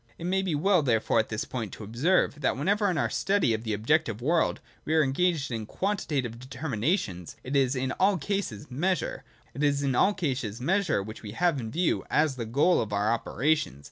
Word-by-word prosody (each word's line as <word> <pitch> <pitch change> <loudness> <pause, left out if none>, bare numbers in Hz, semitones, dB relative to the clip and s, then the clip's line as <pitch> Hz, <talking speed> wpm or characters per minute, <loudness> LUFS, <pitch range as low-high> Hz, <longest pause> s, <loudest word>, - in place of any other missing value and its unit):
It - - -9
may 190 +2 +1
be 185 -5 -1
well 180 +3 +3
therefore 120 -6 +2
at 110 - 0
this 110 -1 -3
point 115 -5 -4
to - - -8
observe 145 - +1
that 135 - +1
whenever 200 +8 +1
in 175 - -1
our - - +2
study 195 - +2
of 110 0 -3
the 110 -2 -2
objective 115 +1 +1
world 160 +7 +1 0.2
we 155 - 0
are 160 - +5
engaged 150 0 0
in 110 -2 -4
quantitative 145 - -2
determinations, 130 - -2
it 130 +3 -4
is 135 -1 +3
in 130 +1 -1
all 195 0 +4
cases 160 - -3
Measure 175 +6 -1 0.3
which 140 - 0
we 105 - -7
have 170 0 +1
in 115 -3 -5
view, 170 +7 0
as 150 -2 +2
the 115 -3 -5
goal 145 +10 +3
of 110 - -4
our 105 +2 +1
operations. 120 - 0
140 Hz, 180 wpm, -27 LUFS, 115-175 Hz, 0.3 s, are